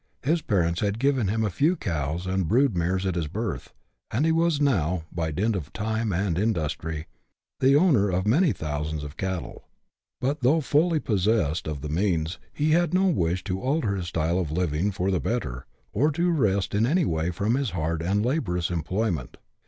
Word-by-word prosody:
His 160 +5 +1
parents 85 - +1
had 100 0 0
given 135 -3 +1
him 110 +3 0
a 105 - -1
few 155 - +2
cows 80 - -3
and 95 -2 0
brood 125 - +3
mares 90 +3 0
at 95 - 0
his 85 -3 -2
birth, 110 +8 -4 0.4
and 130 +8 0
he 165 - +3
was 165 -2 +2
now, 90 - +1
by 80 -2 -2
dint 100 +8 0
of 80 -7 -5
time 110 +1 -1
and 90 -1 0
industry, 80 -6 -2 0.5
the 135 +1 +5
owner 145 - +4
of 95 +1 0
many 150 - +4
thousands 75 -2 -3
of 75 0 -8
cattle. 95 -1 -4 0.6
But 140 +4 -1
though 135 +6 +4
fully 155 +3 +2
possessed 100 - +1
of 75 -3 -4
the 75 - -5
means, 85 -1 0
he 150 +1 0
had 175 +2 +3
no 190 +1 +4
wish 90 - 0
to 95 -1 -3
alter 130 -7 0
his 90 -3 -4
style 85 +2 0
of 80 -5 -2
living 85 +2 0
for 95 0 -1
the 90 - +1
better, 65 - -3 0.3
or 140 +9 +3
to 175 +3 +1
rest 100 - +1
in 110 +3 +2
any 170 +4 +2
way 80 -2 0
from 100 +6 0
his 135 -1 0
hard 80 -2 -2
and 100 +5 +1
laborious 90 - -1
employment. 85 - -2
95 Hz, 190 wpm, -26 LUFS, 85-130 Hz, 0.6 s, the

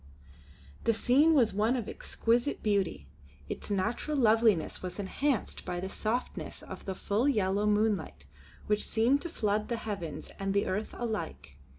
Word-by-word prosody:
The 230 - +3
scene 285 +8 +4
was 240 -6 +4
one 215 +5 +2
of 235 -4 -3
exquisite 235 +5 0
beauty. 200 - 0 0.4
Its - - -5
natural 220 +9 -1
loveliness 220 - +3
was 180 -1 -5
enhanced 225 +5 -1
by 175 - -3
the 190 +1 -4
softness 225 +5 -3
of - - -9
the 190 - -3
full 215 +9 +1
yellow 205 -4 +1
moonlight 210 - +1 0.4
which 210 0 +1
seemed 240 +6 +2
to 340 - -4
flood 210 -7 0
the 235 - 0
heavens 200 -8 -5
and 195 0 -1
the 200 - +3
earth 205 +4 -2
alike. 205 - -4
215 Hz, 155 wpm, -30 LUFS, 195-235 Hz, 0.4 s, scene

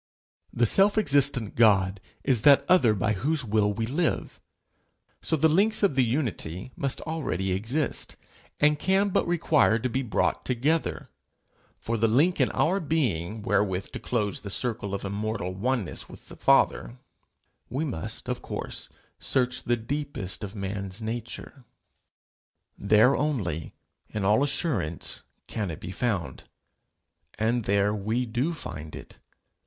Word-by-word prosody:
The 120 - +2
self 195 - +4
existent 140 - +2
God 100 -4 +4 0.2
is 130 -5 +2
that 140 +2 +6
other 130 -12 +5
by 110 +2 +1
whose 140 +7 -1
will 105 -1 +2
we 110 +2 -2
live; 155 +8 -1 0.8
so - - +1
the 160 +1 +4
links 205 +8 +3
of 200 - +4
the 130 -1 +3
unity 115 - -2
must 140 -1 -2
already 115 - -2
exist, 115 +11 -2 0.4
and 150 0 +4
can 195 +3 +2
but 185 - +1
require 155 -8 +3
to 125 +2 -2
be 130 - 0
brought 120 -6 0
together. 140 +6 -1 0.7
For 115 0 -2
the 115 +1 +3
link 150 +11 +3
in - - +3
our 185 +5 +1
being 110 - -1
wherewith 100 -3 0
to - - -6
close 105 -5 -2
the 100 - -7
circle 105 -2 -1
of 100 - -5
immortal 100 -2 -3
oneness 110 -1 -2
with - - -13
the - - -10
Father, - - +2 0.7
we 135 +7 -2
must 120 - -5
of - - -3
course - - -5 0.3
search 125 -1 +1
the 120 0 0
deepest 115 -7 -4
of 100 +1 -6
man's 100 +1 -4
nature: 120 +3 -6 1.1
there 110 +6 +4
only, 100 - -2 0.3
in 105 -2 -3
all 105 +6 +4
assurance, 135 - -1 0.2
can 105 -4 -3
it 80 - -6
be 90 - -7
found. 95 - -2 0.9
And 115 +1 0
there 100 +1 +2
we 110 +4 -1
do 120 +8 -1
find 80 - -7
it. - - -12
115 Hz, 145 wpm, -27 LUFS, 100-145 Hz, 1.1 s, that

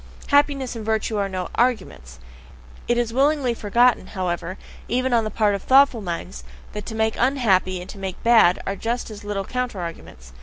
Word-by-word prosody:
Happiness 285 -3 +2
and 225 - -6
virtue 220 0 -1
are 200 -1 -1
no 185 -2 -4
arguments. 70 - -1 0.7
It 240 - +1
is 235 -1 -1
willingly 275 -1 +2
forgotten, 235 +3 +2
however, 180 -1 -3 0.3
even 255 +2 0
on 230 -2 +3
the - - -2
part 210 -2 +1
of 200 - -3
thoughtful 265 -2 +4
minds, 170 - -6 0.3
that 210 -1 -6
to 220 - -6
make 220 0 +1
unhappy 205 -8 +2
and 180 - -9
to 200 - -12
make 190 -2 -6
bad 225 -7 +5
are 195 - -2
just 235 +3 -3
as 210 0 -10
little 205 -1 -3
counter 250 -4 -3
arguments. 65 - -9
220 Hz, 185 wpm, -22 LUFS, 185-245 Hz, 0.7 s, bad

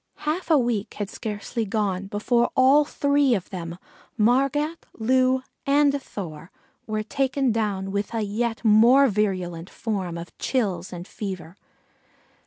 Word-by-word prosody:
Half 325 +4 -1
a 315 - +6
week 235 -5 -1
had 205 0 -4
scarcely 220 +2 -4
gone 200 -3 -1
before 235 +4 +1
all 275 +3 +5
three 285 -3 +2
of 190 - -5
them, 170 -2 -6 0.4
Margat, 275 +8 +1
Loo, 255 +3 +2 0.2
and 285 0 +3
Thor, 170 -8 -8 0.4
were 215 -1 -2
taken 270 +2 0
down 200 -3 -1
with 200 +1 -2
a 225 - 0
yet 225 +3 -2
more 235 +6 +6
virulent 185 -5 -1
form 190 -6 -3
of 170 +1 -9
chills 190 -9 -1
and 175 0 -7
fever. 185 -5 -6
220 Hz, 135 wpm, -24 LUFS, 195-260 Hz, 0.4 s, a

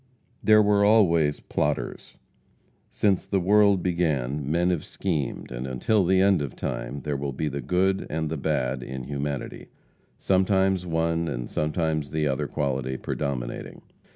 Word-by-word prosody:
There 110 0 +6
were 100 0 +3
always 85 -9 +4
plotters. - - -3 0.7
Since 100 -3 +1
the 100 - +1
world 100 0 +4
began 75 -6 -1
men 85 +3 +2
have 85 -4 -1
schemed, 80 -10 -3
and 60 +1 -5
until 95 - +1
the 95 +2 +3
end 95 -4 +4
of 70 -4 -5
time 70 +2 -4
there 75 +1 -2
will 70 0 -3
be 75 - -2
the 70 -1 -3
good 95 +7 +1
and 80 0 -2
the 80 - -3
bad 65 -3 -1
in 65 +1 -6
humanity, 70 0 -4 0.5
sometimes 95 -1 +2
one 85 0 0
and - - -4
sometimes 75 -1 -1
the 75 0 -1
other 65 -2 -1
quality 65 -2 -2
predominating. 70 -4 -4
80 Hz, 150 wpm, -25 LUFS, 70-95 Hz, 0.7 s, There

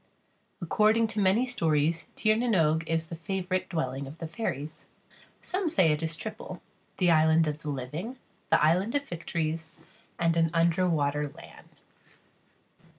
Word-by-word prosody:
According 215 +6 +3
to 215 -1 -3
many 200 +6 +3
stories, 165 - 0
Tír 215 0 +3
na 240 +3 0
n 225 - +2
Og 160 -1 +3
is 165 0 0
the 165 - -7
favourite 185 +1 -2
dwelling 135 -4 -2
of 145 +4 -10
the 165 - -5
fairies. 155 - -5 0.6
Some 370 -2 -1
say 185 - +4
it 150 +1 -1
is 165 0 -1
triple - - -7 0.4
the 180 -2 +3
island 160 0 +4
of 150 0 -3
the 150 - -5
living, 150 - -5 0.3
the - - +5
island 185 - +2
of 285 - +1
victories, 165 - -4 0.4
and 165 -1 +2
an 165 0 +3
underwater 165 -4 +2
land. 145 - -14
165 Hz, 150 wpm, -28 LUFS, 155-190 Hz, 0.6 s, the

